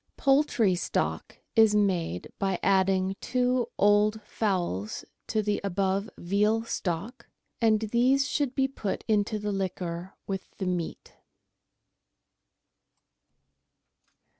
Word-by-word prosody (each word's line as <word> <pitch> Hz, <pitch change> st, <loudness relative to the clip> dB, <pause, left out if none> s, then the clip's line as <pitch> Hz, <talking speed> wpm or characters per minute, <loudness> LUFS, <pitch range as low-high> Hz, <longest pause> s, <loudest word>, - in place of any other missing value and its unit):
Poultry 270 Hz, -8 st, +3 dB
Stock 180 Hz, -, -2 dB, 0.2 s
is 220 Hz, -2 st, +6 dB
made 180 Hz, -, 0 dB
by 195 Hz, -2 st, 0 dB
adding 190 Hz, 0 st, +2 dB
two 250 Hz, -1 st, +1 dB
old 205 Hz, +1 st, +4 dB
fowls 175 Hz, -, -2 dB, 0.2 s
to 215 Hz, -1 st, 0 dB
the 205 Hz, 0 st, 0 dB
above 195 Hz, +2 st, 0 dB
veal 210 Hz, +5 st, +1 dB
stock, 205 Hz, +2 st, -4 dB, 0.3 s
and 220 Hz, -2 st, +4 dB
these 250 Hz, +5 st, +2 dB
should 280 Hz, -4 st, -1 dB
be 270 Hz, -1 st, +2 dB
put 225 Hz, -7 st, -4 dB
into 215 Hz, 0 st, +1 dB
the 210 Hz, 0 st, -3 dB
liquor 185 Hz, -2 st, -4 dB
with 195 Hz, -1 st, -5 dB
the 190 Hz, -, -3 dB
meat. 180 Hz, -2 st, -3 dB
205 Hz, 105 wpm, -28 LUFS, 190-225 Hz, 0.3 s, is